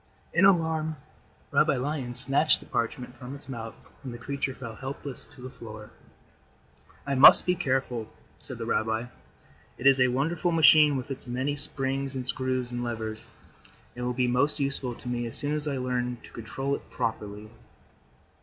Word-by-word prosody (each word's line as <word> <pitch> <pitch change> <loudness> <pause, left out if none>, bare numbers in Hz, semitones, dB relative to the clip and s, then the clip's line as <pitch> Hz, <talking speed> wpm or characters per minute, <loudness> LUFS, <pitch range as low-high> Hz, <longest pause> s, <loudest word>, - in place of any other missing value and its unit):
In 180 +3 +5
alarm, 160 -4 +2 0.6
Rabbi - - +3
Lion 130 -2 -3
snatched 140 +5 +3
the - - -14
parchment 125 +2 -3
from 125 +2 -8
its 140 -1 -11
mouth 115 -4 -7 0.3
and 130 - -6
the 120 - -7
creature 135 +1 -4
fell 115 -3 -8
helpless 135 +2 -7
to - - -16
the 130 - -6
floor. 110 -3 -11 1.1
"I 140 - -1
must 135 +1 +8
be 180 - +3
careful," 130 -8 -2 0.3
said - - -7
the - - -5
rabbi. 110 +1 -1 0.7
"It 125 - -8
is 135 -1 +6
a 125 - +5
wonderful 160 +7 0
machine 155 -3 +6
with 130 +2 -6
its 135 - -7
many 130 +4 -2
springs 135 -2 +3
and 130 -1 -4
screws 130 -1 -1
and 120 0 -3
levers, 110 -2 -5 0.7
and 125 - -6
will 125 - -1
be 125 +1 +1
most 125 +5 +2
useful 135 -3 0
to - - -11
me 120 -1 -2
as 115 - +2
soon 145 +1 +3
as 150 0 -2
I 140 -2 -1
learn 125 -1 -2
to - - -14
control 135 +5 -4
it - - -6
properly." 105 -1 -4
130 Hz, 175 wpm, -27 LUFS, 120-140 Hz, 1.1 s, must